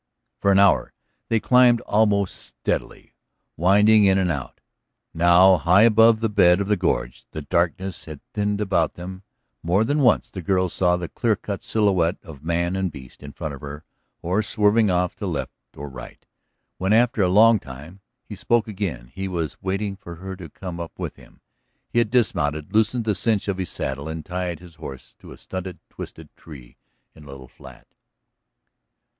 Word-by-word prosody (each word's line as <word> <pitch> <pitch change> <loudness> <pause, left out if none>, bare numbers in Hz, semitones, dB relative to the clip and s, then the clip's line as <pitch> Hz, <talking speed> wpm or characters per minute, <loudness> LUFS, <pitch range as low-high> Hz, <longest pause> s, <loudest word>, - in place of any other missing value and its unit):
For 100 - +2
an 95 - +4
hour 100 0 +3 0.4
they 115 - +2
climbed 125 0 +5
almost 105 -2 +1
steadily, - - -5 0.4
winding 105 +4 +5
in 95 -1 +4
and 95 -2 +1
out. 70 -5 -6 0.5
Now, 85 +3 +5
high 90 +7 +4
above 115 0 +5
the 115 - +2
bed 90 -3 +4
of 100 - -2
the 105 - +2
gorge, 65 -10 -2
the 80 - -5
darkness 90 +2 -1
had 75 -3 -9
thinned 105 0 -1
about 95 -6 0
them; 95 +2 -8 0.4
more 90 +6 +2
than 145 +6 0
once 125 -6 +2
the 95 - -6
girl 95 +1 +1
saw 90 0 +1
the 90 -1 -5
clear 115 +3 0
cut 100 0 -6
silhouette 95 -5 +1
of 80 -7 -12
man 85 +2 -1
and 95 -2 -1
beast 65 -4 -13
in 70 0 -9
front 75 0 -6
of 70 - -10
her 75 +1 -8 0.4
or 90 +5 +1
swerving 105 0 +2
off 90 -1 0
to - - -4
right - - -2 0.3
or 75 - -6
left. 60 -1 -11 0.5
When, 95 +3 +1
after 115 -1 +3
a 90 - +3
long 110 +3 +6
time, 70 +6 -11 0.2
he - - -10
spoke 115 +3 +1
again 95 - -5
he 95 0 -4
was 85 -6 -4
waiting 100 +1 -2
for 85 -3 -10
her 95 +3 -7
to 90 -4 -10
come 90 +2 -8
up 85 -1 -7
with - - -6
him. - - -19 0.5
He 120 - +1
had 115 -3 +1
dismounted, 80 -11 0
loosened 110 +2 +1
the 105 - +1
cinch 105 +1 0
of 95 -2 -2
his 90 - -3
saddle 70 +2 -4
and 80 -1 -6
tied 90 -2 -4
his 90 -2 -14
horse 70 -4 -9
to - - -13
a - - -11
stunted, 95 -1 -7
twisted - - -10
tree 65 -6 -14 0.4
in 75 - -16
a - - -14
little 70 -2 -11
flat. - - -15
95 Hz, 185 wpm, -23 LUFS, 80-105 Hz, 0.5 s, long